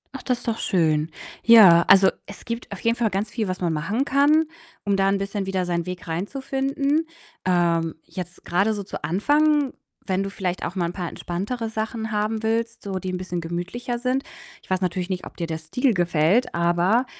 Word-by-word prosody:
Ach, 270 - -6
das 250 -2 -1
ist - - -11
doch 230 -1 -1
schön. 160 -4 +1 0.3
Ja, 195 -8 +8
also, 190 -1 +7 0.2
es 200 - -11
gibt 230 -1 -5
auf 200 - -6
jeden 230 0 +2
Fall 230 -3 +1
ganz 200 +2 -2
viel, 220 -4 -2
was 185 0 -4
man 170 -2 +1
machen 200 - -1
kann, 285 +3 +4 0.4
um 200 -1 +2
da 195 0 +3
'n 200 - +2
bisschen 195 0 -3
wieder 190 -1 -1
seinen 170 0 -2
Weg 180 0 -6
reinzufinden. 275 - -1 0.4
Ähm, 170 -2 +2
jetzt 180 -1 -8
grade 195 +5 +1
so 205 - -4
zu 190 - -8
Anfang, 290 - +2 0.3
wenn 190 -1 0
du 195 - -2
vielleicht 185 -2 -3
auch 180 - -5
mal 180 -2 0
'n 170 - -3
paar 180 -3 -4
entspanntere 210 +7 -4
Sachen 220 0 -3
haben 215 +1 -1
willst, 230 +1 -1
so 195 -2 -3
die 185 0 -4
bisschen 180 -1 -3
gemütlicher 180 +9 -4
sind 255 +2 0 0.4
ich - - -23
weiß 185 0 0
natürlich 180 0 -1
nicht, 185 -1 -3
ob - - -11
dir 170 - -3
der 160 -1 -3
Stil 230 - 0
gefällt, 175 +6 +2
aber 175 +8 +2
195 Hz, 200 wpm, -23 LUFS, 175-230 Hz, 0.4 s, Ja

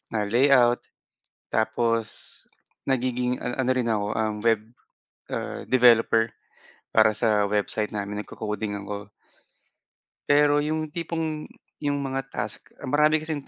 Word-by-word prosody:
ah, 105 - +1
layout. 120 +2 +4 0.7
Tapos 115 0 -1 0.4
nagiging 125 -1 0
an 125 +1 -3
ano 130 -1 +1
rin 125 -2 0
ako, 105 -2 0
ah, 110 -1 0 0.2
web, 115 -2 +3 0.7
ah, - - -4
developer 115 -2 +4 0.6
para - - +6
sa 105 -2 +2
website 105 +1 0
namin, 105 0 -4
nagko-coding 105 -1 -4
ako. 100 0 -7 1.2
Pero 145 0 +5
'yong 155 +1 -2
tipong, 160 -2 -3 0.3
'yong 145 -1 0
mga 135 -1 -3
task, - - -6
marami 150 +3 +3
kasing 155 -3 -4
120 Hz, 115 wpm, -25 LUFS, 110-145 Hz, 1.2 s, para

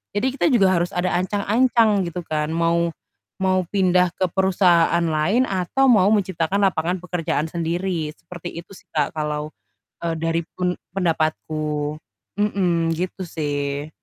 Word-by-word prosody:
jadi 245 +6 +1
kita - - 0
juga 195 -6 +4
harus 175 +3 0
ada 180 +1 0
ancang-ancang 210 +2 +2
gitu 175 +1 -5
kan, 155 0 -1
mau 170 0 +1 0.5
mau 185 -1 +2
pindah 180 -2 +2
ke 185 -2 0
perusahaan 175 -3 +3
lain 165 +9 +2
atau 195 +9 +1
mau 200 -6 +5
menciptakan 190 -1 0
lapangan 180 -1 +1
pekerjaan 165 -3 -2
sendiri 170 -1 -2
seperti 175 +1 -9
itu 175 - -26
sih - - -17
Kak 150 0 0
kalau, 150 -1 -2 0.6
eee, 165 - 0
dari 165 +1 0 0.2
pen 180 -1 0 0.2
pendapatku, 155 -3 -1 0.4
mhm, 175 -5 +1
gitu 185 +2 -4
sih. 145 -2 -3
175 Hz, 135 wpm, -22 LUFS, 160-190 Hz, 0.6 s, mau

